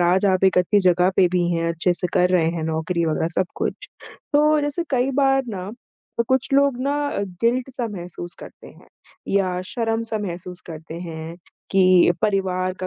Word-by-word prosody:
आज 180 +3 +3
आप 190 -1 +2
एक 190 -1 +4
अच्छी 180 +3 +3
जगह 180 0 +3
पे 190 - +5
भी 175 -1 +1
हैं। 165 0 -1
अच्छे 170 +2 +1
से 180 - -2
कर 180 - +3
रहे 170 -3 +3
हैं 165 -1 -4
नौकरी 160 +2 -1
वगैरह 160 0 0
सब 185 - +1
कुछ। - - -4 0.4
तो 300 +1 +4
जैसे 290 +4 -2
कई 260 0 +1
बार 270 -1 +3
ना 195 -3 -5 0.5
क - - +2
कुछ 260 -1 +2
लोग 280 -2 +3
ना 275 +2 0 0.5
गिल्ट 245 +3 +1
सा 245 -2 -3
महसूस 175 -2 -7
करते - - -12
हैं - - -16 0.4
या 185 -2 +1
शर्म-सा 225 -1 -2
महसूस 180 -2 -5
करते 160 -1 -9
हैं 165 -1 -7 0.3
कि 185 -2 +5
परिवार 185 -3 0
का 185 - -2
185 Hz, 180 wpm, -22 LUFS, 175-230 Hz, 0.5 s, पे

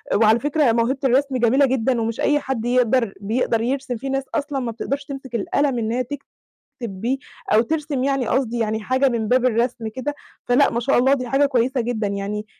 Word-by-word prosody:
وعلى 220 +2 +4
فكرة 290 -2 +2
موهبة 235 +4 +1
الرسم 265 +1 +2
جميلة 255 +4 +4
جدًا 250 -2 0
ومش 225 0 -3
أي 295 - +3
حد 260 -5 -3
يقدر 245 -3 +2
بيقدر 225 +2 0
يرسم، 255 0 -2
في 270 +4 -5
ناس 270 0 -1
أصلًا 285 -2 -1
ما 240 -2 -3
بتقدرش 275 +5 -3
تمسك 270 -3 -7
القلم 265 +4 0
إنها 230 +3 -1
تكتب 280 +3 -6 0.6
بيه، 235 +5 -2 0.4
أو 220 - +6
ترسم 290 0 -1
يعني 270 -3 0
قصدي 240 -3 0
يعني 220 -1 -1
حاجة 260 +5 +2
من 225 -3 -2
باب 255 0 +3
الرسم 235 -1 0
كده، 260 +6 -4 0.3
فلأ 260 +4 +4
ما 235 - -1
شاء 265 +1 +2
الله 265 +3 +4
دي 255 -3 -4
حاجة 280 +2 +3
كويسة 255 0 +1
جدًا، 230 -3 -1
يعني 200 +1 -3
250 Hz, 195 wpm, -21 LUFS, 230-270 Hz, 0.6 s, أو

